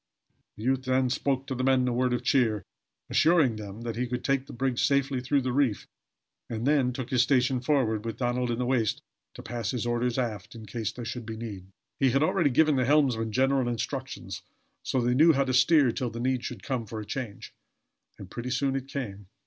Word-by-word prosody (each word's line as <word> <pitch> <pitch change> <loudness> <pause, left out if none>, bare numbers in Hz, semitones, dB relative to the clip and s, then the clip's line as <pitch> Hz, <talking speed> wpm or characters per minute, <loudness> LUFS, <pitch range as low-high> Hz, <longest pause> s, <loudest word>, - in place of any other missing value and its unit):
The 105 - -8
youth 130 +1 0
then 130 -1 +2
spoke 135 0 0
to 135 - -4
the 130 0 -2
men 130 -1 +3
a 125 - 0
word 125 +1 +1
of 125 -1 -1
cheer, 120 -5 +2 0.5
assuring 155 -9 +4
them 105 +1 -8
that 115 -1 -4
he 125 +1 -1
could 125 0 -4
take 135 -1 0
the - - -9
brig 125 0 -1
safely 140 -2 +1
through 140 +2 +1
the 125 -1 -2
reef, 130 -6 +1 0.6
and 115 0 -3
then 140 -3 +3
took 130 0 -6
his 125 -2 +4
station 130 0 +2
forward, 125 -6 +1
with 115 -1 -4
Donald 125 0 0
in 120 - -1
the 125 - -1
waist 120 -4 0 0.3
to - - -9
pass 115 -2 -4
his 120 -1 -2
orders 120 +1 0
aft, 110 -4 -3
in 110 -1 -9
case 110 0 -3
there 120 0 -8
should 120 -1 -5
be 110 -1 -5
need. 105 -5 -7 0.3
He 135 - +4
had 135 +4 +2
already 160 -1 +2
given 150 +2 +3
to - - +2
the 125 - 0
helmsmen 130 -7 +2
general 130 +1 +2
instructions, 120 -2 -4 0.4
so 130 - -1
they 120 +1 +2
knew 160 +5 +6
how 140 -1 +2
to 130 -1 -2
steer 135 0 +5
till 125 +1 -2
the 115 0 -7
need 125 0 0
should 110 -7 -6
come 120 -2 -3
for 110 +2 -6
a 105 - -6
change. 115 -4 -6 0.6
And 95 - -9
pretty 120 +6 -6
soon 135 +1 0
it 135 -1 -3
came. 105 -9 -6
125 Hz, 225 wpm, -28 LUFS, 115-135 Hz, 0.6 s, knew